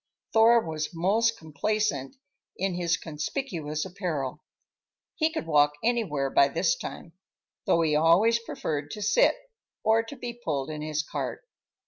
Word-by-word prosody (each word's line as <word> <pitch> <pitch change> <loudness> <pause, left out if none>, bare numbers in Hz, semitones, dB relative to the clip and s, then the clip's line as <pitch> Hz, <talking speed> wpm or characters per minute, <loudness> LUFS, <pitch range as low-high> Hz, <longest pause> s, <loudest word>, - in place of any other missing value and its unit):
Thor 230 +1 +6
was 155 0 -4
most 220 +7 +2
complacent 160 -3 -2 0.4
in 190 0 -1
his 175 -1 0
conspicuous 155 - -4
apparel. 165 -8 -3 0.7
He 315 -1 +1
could 315 - -4
walk 150 -2 +4
anywhere 185 - 0
by 140 - +5
this 165 +5 +1
time—though 170 -1 -4
he 155 -2 +2
always 175 +9 +4
preferred 150 -10 -4
to 210 - -5
sit, 210 - +4 0.5
or 220 +1 +4
to 225 +5 -9
be 245 -2 -6
pulled 145 -1 -2
in 150 -1 -5
his 155 0 -2
cart. 450 - -5
170 Hz, 135 wpm, -27 LUFS, 150-220 Hz, 0.7 s, Thor